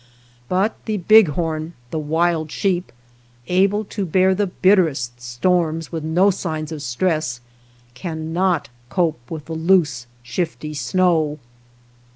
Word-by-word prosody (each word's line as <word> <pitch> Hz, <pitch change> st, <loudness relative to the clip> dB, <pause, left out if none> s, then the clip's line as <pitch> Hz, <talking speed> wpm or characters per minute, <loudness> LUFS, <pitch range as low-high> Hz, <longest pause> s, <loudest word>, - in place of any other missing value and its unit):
But 195 Hz, +4 st, 0 dB
the 215 Hz, -1 st, -1 dB
bighorn, 165 Hz, -5 st, +3 dB, 0.2 s
the 160 Hz, -, -2 dB
wild 160 Hz, +1 st, 0 dB
sheep, 180 Hz, +2 st, -1 dB, 0.5 s
able 195 Hz, +6 st, +2 dB
to 200 Hz, 0 st, -4 dB
bear 185 Hz, +2 st, +3 dB
the 200 Hz, +1 st, 0 dB
bitterest 160 Hz, -11 st, +2 dB
storms 160 Hz, +6 st, 0 dB
with 165 Hz, -3 st, -4 dB
no 175 Hz, +6 st, +3 dB
signs 160 Hz, -4 st, -4 dB
of 155 Hz, -2 st, -5 dB
stress, 150 Hz, -1 st, -1 dB, 0.5 s
cannot 160 Hz, +4 st, -1 dB, 0.2 s
cope 160 Hz, -2 st, 0 dB
with 155 Hz, -3 st, -6 dB
the 165 Hz, -, -6 dB
loose 160 Hz, -6 st, +2 dB, 0.2 s
shifty 155 Hz, +2 st, -3 dB
snow. 160 Hz, -2 st, +1 dB
165 Hz, 120 wpm, -21 LUFS, 155-185 Hz, 0.5 s, bighorn